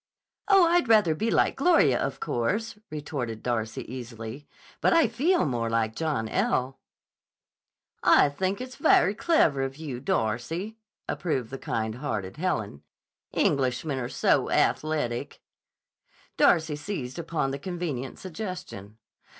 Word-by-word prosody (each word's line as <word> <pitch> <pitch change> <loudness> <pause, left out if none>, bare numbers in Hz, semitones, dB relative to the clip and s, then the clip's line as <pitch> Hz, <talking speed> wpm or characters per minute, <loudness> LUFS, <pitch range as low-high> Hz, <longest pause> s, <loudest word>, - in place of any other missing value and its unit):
"Oh, 390 -4 +6
I'd 340 -5 +3
rather 210 -8 +5
be 220 +9 -1
like - - +2
Gloria, 275 - +4
of 135 - -3
course," 205 - -1
retorted 140 -7 -5
Darcy 115 -2 -2
easily. 120 +2 -8 0.3
"But - - +4
I 330 -6 +5
feel 290 - +2
more 120 -4 -1
like 115 -1 0
John 150 -9 -1
L." 135 - 0 1.2
"I - - +6
think 185 +7 -2
it 255 0 -7
very 195 - +4
clever 210 - +2
of 135 +1 -3
you, 145 -6 -5
Darcy," 140 - -2 0.3
approved 130 -9 -2
the 135 - -6
kind 110 -1 -2
hearted 100 -9 -3
Helen. 110 - -2 0.5
"Englishmen 130 +1 0
are 120 -1 -3
so - - +2
athletic." 150 -6 0 1.0
Darcy 160 -3 +3
seized 145 -5 -5
upon 160 -4 -1
the 140 - -4
convenient 155 -7 -4
suggestion. 175 - -7
145 Hz, 125 wpm, -27 LUFS, 120-185 Hz, 1.2 s, Oh